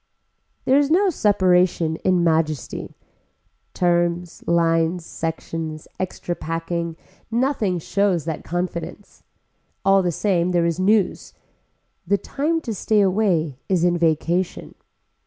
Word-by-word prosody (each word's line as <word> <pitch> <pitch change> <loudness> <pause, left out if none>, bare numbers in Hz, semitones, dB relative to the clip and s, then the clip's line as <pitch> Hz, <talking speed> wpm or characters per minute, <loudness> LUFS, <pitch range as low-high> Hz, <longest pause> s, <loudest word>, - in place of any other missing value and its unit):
There 265 +2 +5
is 285 -1 +1
no 375 +4 +3
separation 180 - +2
in 185 -2 +1
majesty. 160 -3 -1 0.8
Terms, 175 -1 0
lines, 165 0 +2
sections, 160 -1 -5
extra 180 -1 -3
packing, 165 0 -4 0.3
nothing 230 -6 0
shows 180 -1 0
that 160 -2 -4
confidence. 175 +3 -5 0.6
All 195 0 +5
the 180 -1 0
same 180 0 0
there 170 -1 +3
is 170 0 -1
news. 200 +1 +1 0.7
The 200 - +3
time 305 - -1
to 235 -7 -4
stay 210 +1 +2
away 180 -8 +1
is 180 -3 +2
in 175 0 +3
vacation. 170 +2 0
175 Hz, 115 wpm, -22 LUFS, 165-200 Hz, 0.8 s, There